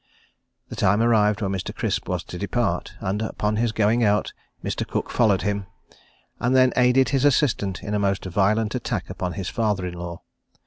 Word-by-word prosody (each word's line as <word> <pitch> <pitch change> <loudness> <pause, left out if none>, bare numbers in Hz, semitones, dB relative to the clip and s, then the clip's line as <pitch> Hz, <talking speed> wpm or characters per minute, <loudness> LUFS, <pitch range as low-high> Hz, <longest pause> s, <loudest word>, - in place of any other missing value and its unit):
The - - -7
time 100 +3 +2
arrived 110 -2 +3
when 95 - -1
Mr. 95 -2 -4
Crisp - - -2
was - - -1
to - - -8
depart, - - -1
and 100 +3 -2
upon 105 -1 -1
his 115 0 +1
going 110 +2 +2
out, 105 -1 +1 0.3
Mr. - - -2
Cooke - - -3
followed 105 -5 +3
him, 100 -2 -2 0.7
and 125 +2 +1
then 130 -1 +5
aided 125 +1 +4
his 135 -2 +1
assistant 120 -9 +1
in 105 - -4
a 105 - +1
most 100 -1 0
violent 105 +4 +1
attack 120 -8 -3
upon 90 0 -3
his 95 -2 -4
father 105 -5 0
in 90 - -4
law. 85 -1 -7
105 Hz, 185 wpm, -23 LUFS, 95-115 Hz, 0.7 s, then